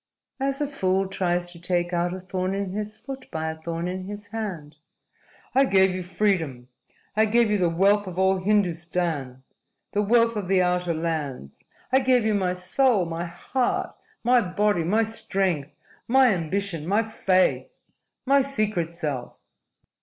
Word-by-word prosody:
"As 275 +1 -1
a - - +2
fool 195 -9 0
tries 175 -2 -1
to 170 - -12
take 175 0 -1
out 175 0 +1
a 185 - -5
thorn 185 +1 -3
in 200 -1 -3
his 210 +2 -5
foot 270 +1 -9
by 160 0 -3
a - - -7
thorn 170 +1 -3
in 185 +1 -4
his 205 +1 -8
hand." 180 -9 -5 0.8
"I 270 +2 +5
gave 190 -5 +4
you 185 - -3
freedom. 175 -9 -1 0.5
I 220 +1 +4
gave 230 0 +3
you 210 - +2
the 175 -2 +3
wealth 200 +4 +3
of 180 -1 -7
all 190 0 +3
Hindustan, 170 -8 -1 0.5
the 205 - +1
wealth 230 +2 +3
of 205 -3 -3
the 190 0 +3
outer 180 -1 +1
lands. 150 - -4 0.3
I 265 - +5
gave 255 -3 +3
you 220 - +2
my 185 -3 +1
soul, 190 +3 +2
my 165 +1 -4
heart, 210 +9 -2 0.3
my 245 +1 +5
body, 205 -1 +1
my 210 +7 +2
strength, 190 -8 -1 0.4
my 260 +1 +5
ambition, 170 -1 -2
my 205 +4 +2
faith, 190 - +1 0.6
my 275 +1 +5
secret 215 -11 -2
self." 145 -7 -4
185 Hz, 160 wpm, -25 LUFS, 170-215 Hz, 0.8 s, I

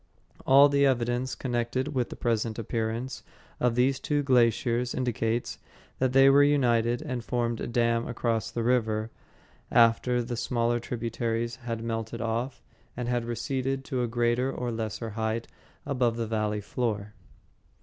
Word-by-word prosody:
All 140 +2 +8
the 140 0 +2
evidence 125 -1 +1
connected 125 +2 -2
with 130 -5 -1
the - - -7
present 115 -2 -1
appearance 115 +3 -3 0.4
of 120 -1 +1
these 130 +2 +2
two 145 0 0
glaciers 125 -1 +2
indicates 120 -2 -1 0.4
that 130 -1 +2
they 135 +1 +6
were 140 +1 +7
united 120 -3 +2
and 125 -6 -4
formed 120 -1 -1
a - - -3
dam 115 0 +1
across 115 -3 -1
the 115 - -3
river 110 -2 +1 0.6
after 120 +1 +3
the 120 +1 -4
smaller 120 0 0
tributaries 115 0 -3
had 120 -2 -4
been 115 - -7
melted 115 0 -3
off 120 +3 -3 0.3
and 120 -1 -3
had 120 -1 0
receded 135 +3 -2
to 130 -4 -2
a 120 - 0
greater 120 +2 +1
or 125 -2 -3
lesser 110 0 -4
height 110 +1 -2 0.4
above 125 -4 0
the 115 - -1
valley 105 -1 -1
floor. 105 -2 -3
120 Hz, 150 wpm, -28 LUFS, 115-125 Hz, 0.6 s, All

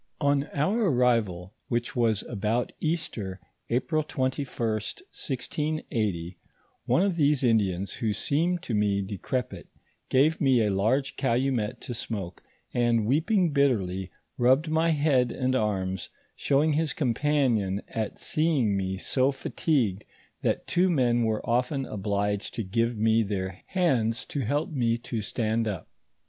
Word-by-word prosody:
On 140 -1 +2
our 200 +10 +1
arrival, 115 - +1
which 120 0 -2
was 115 -4 +2
about 110 +2 -1
Easter, 115 - -2 0.3
April 155 +6 +1
21st, 130 - -2
1680,* 115 - -2 0.5
one 180 - +3
of 195 -4 0
these 145 -3 +3
Indians 100 -5 +2
who 110 -2 -1
seemed 165 - 0
to 120 - -4
me 100 -1 +1
decrepit, 105 +5 -4 0.4
gave 145 +5 +3
me 130 -6 +4
a 105 - +1
large 120 +8 +1
calumet 125 -4 0
to 120 - -5
smoke, 100 -6 -5 0.3
and 120 -2 +2
weeping 165 - +2
bitterly, 95 -10 +1 0.3
rubbed 130 +6 +4
my 160 +1 +2
head 145 -6 +2
and 130 0 0
arms, 95 -5 -1 0.3
showing 150 +3 +2
his 155 +1 0
compassion 120 -7 +1
at 110 -2 -3
seeing 150 -10 +1
me 95 -1 -2
so 130 +7 +1
fa 135 -1 -5
tigued 115 - +1 0.4
that - - 0
two 180 +2 +2
men 120 -7 +2
were 110 +1 -1
often 125 +3 +1
obliged 100 -1 -2
to 115 - -2
give 115 +4 0
me 110 +1 +3
their 95 -3 -3
hands 125 -12 +1
to 145 - -4
help 145 - -1
me 120 -5 +1
to 115 -1 -4
stand 110 +1 -1
up. 100 -5 -4
120 Hz, 135 wpm, -27 LUFS, 105-145 Hz, 0.5 s, me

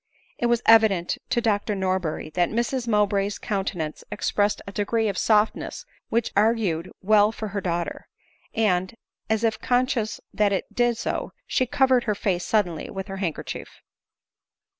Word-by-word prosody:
It 240 - +2
was 235 0 +1
evident 220 -6 +4
to 235 - +1
Dr 210 -2 0
Norberry 185 -5 -2
that 175 +2 +1
Mrs 240 +2 -1
Mowbray's 205 -2 +1
countenance 185 -6 -3
expressed 205 0 0
a 200 - -7
degree 220 +3 0
of 200 - -3
softness 215 +2 +1 0.2
which 230 0 0
augur 210 -5 +2
ed 170 - -10
well 210 +1 +5
for 220 -1 -5
her 200 0 -3
daughter; 175 -2 -3 0.5
and^ 190 -1 +1 0.3
as 220 0 +1
if 225 -1 +1
conscious 245 -3 0
that 205 -1 +2
it 190 - -3
did 240 -1 +2
so, - - -3
she 255 - +1
covered 260 -1 +3
her 210 -2 0
face 185 -3 -1
suddenly 180 -6 0
with 190 0 -6
her 195 - -5
handkerchief. 180 -5 -5
210 Hz, 155 wpm, -25 LUFS, 190-225 Hz, 0.5 s, well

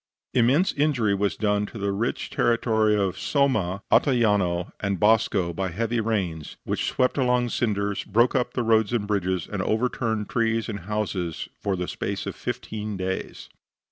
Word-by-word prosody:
Immense 130 +9 +3
injury 140 -8 +1
was 100 0 0
done 105 -1 0
to 115 - -10
the 100 -1 -1
rich 110 +5 -2
territory 110 -2 +2
of 100 -3 0
Somma, 110 - +1
Ottajano 105 - +2
and 100 -3 -1
Bosco 105 -5 +3
by 95 +2 -2
heavy 115 +6 -1
rains, 95 -9 -2
which - - -2
swept 130 +2 +1
along 125 -1 +2
cinders, 100 -4 -1
broke 115 +4 +2
up 125 -2 0
the 125 - 0
road 110 -1 +3
and 110 -4 0
bridges, 95 -4 -1
and - - -3
overturned 110 -2 -1
trees 115 -1 0
and 105 -2 -4
houses 95 -6 -2
for 100 -2 -1
the 90 -1 -3
space - - -4
of - - -5
fifteen 105 -2 -4
days. 95 0 -4
105 Hz, 160 wpm, -25 LUFS, 100-120 Hz, -, Immense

